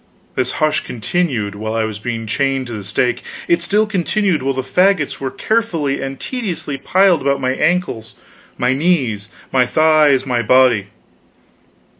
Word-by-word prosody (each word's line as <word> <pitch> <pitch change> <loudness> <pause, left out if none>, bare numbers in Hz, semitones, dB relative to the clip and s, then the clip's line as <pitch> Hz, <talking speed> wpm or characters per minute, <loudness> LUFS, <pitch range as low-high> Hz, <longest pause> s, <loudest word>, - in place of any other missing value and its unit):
This 130 -1 -1
hush 155 0 0
continued 120 - -2
while 110 +2 -4
I 115 - +1
was 110 -1 -4
being 115 0 -4
chained 135 +3 -1
to 120 - -7
the 105 -2 -6
stake; 105 +5 -1 0.3
it 170 0 +2
still 205 +5 +2
continued 195 -3 0
while 135 0 -1
the 130 - -2
fagots 180 +2 +1
were 135 - -3
carefully 165 - -1
and 135 0 -5
tediously 175 - -4
piled 185 +3 +3
about 140 0 +1
my 130 -1 0
ankles, 165 -9 -1 0.4
my 125 +1 +1
knees, 130 - 0 0.2
my 125 -2 +3
thighs, 155 -3 +4
my 125 -3 0
body. 125 -5 +3
135 Hz, 155 wpm, -18 LUFS, 120-170 Hz, 0.4 s, thighs